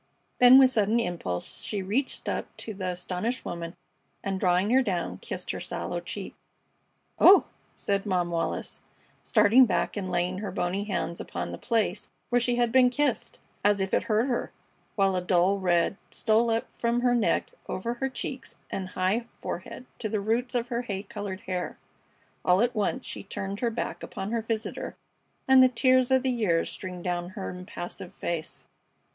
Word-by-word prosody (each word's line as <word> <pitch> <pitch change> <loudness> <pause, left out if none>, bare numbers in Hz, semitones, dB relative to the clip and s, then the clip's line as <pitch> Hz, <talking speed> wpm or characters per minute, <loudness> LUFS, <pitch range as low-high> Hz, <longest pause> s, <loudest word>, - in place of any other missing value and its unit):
Then 250 +1 +9
with 260 -1 +7
sudden 220 0 +2
impulse 170 - -3
she 205 -3 -3
reached 240 +9 -1
up - - -2
to 220 - -5
the 190 -2 -4
astonished 180 +7 -2
woman 170 0 -5 0.5
and, 195 -1 -2
drawing 185 +3 +2
her 260 +2 +6
down, 185 -8 -2
kissed - - -5
her - - -5
sallow - - -4
cheek. - - -6 0.9
"Oh!" 390 +2 +9 0.3
said 200 +1 -1
Mom 180 -3 +1
Wallis, 165 -1 -2 0.4
starting 245 +5 +5
back 190 - 0
and 195 -3 -3
laying 180 +1 0
her 205 -1 -4
bony 185 +2 -1
hands 180 -4 -2
upon - - -5
the - - -7
place 220 -5 0 0.2
where 245 0 +3
she 245 0 +1
had 240 -1 +2
been 255 0 +6
kissed, 280 0 -1 0.3
as 205 0 +4
if 190 0 -2
it - - +2
hurt 220 +2 +2
her, 250 -3 -2 0.4
while 195 -2 +3
a 180 - 0
dull 180 +2 +3
red 180 +1 +2
stole 225 +1 +2
up 225 0 +1
from 235 +1 +1
her 245 0 +3
neck 235 -2 +1 0.2
over 230 +6 -2
her 270 +2 -2
cheeks 260 -1 -6 0.2
and 190 -1 -3
high 205 +6 +1
forehead 250 - -6
to 215 - -2
the 215 0 0
roots 230 +5 -1
of 240 0 0
her 240 -1 -1
hay 200 -5 -4
colored 205 -3 -6
hair. 180 -1 -4 0.7
All 180 +2 +4
at 240 +1 +2
once 240 +4 -1
she - - -6
turned 195 0 -5
her 240 - +1
back 230 - -4
upon 195 +2 -5
her 230 -1 0
visitor 225 0 -3 0.5
and 265 0 +8
the 255 - +7
tears 255 +1 +3
of 260 0 +3
the 260 - +1
years 205 -9 +1
streamed 180 -2 -6
down 175 -1 -2
her 195 - -3
impassive 180 -1 -7
face. 165 -2 -4
205 Hz, 180 wpm, -27 LUFS, 185-240 Hz, 0.9 s, Then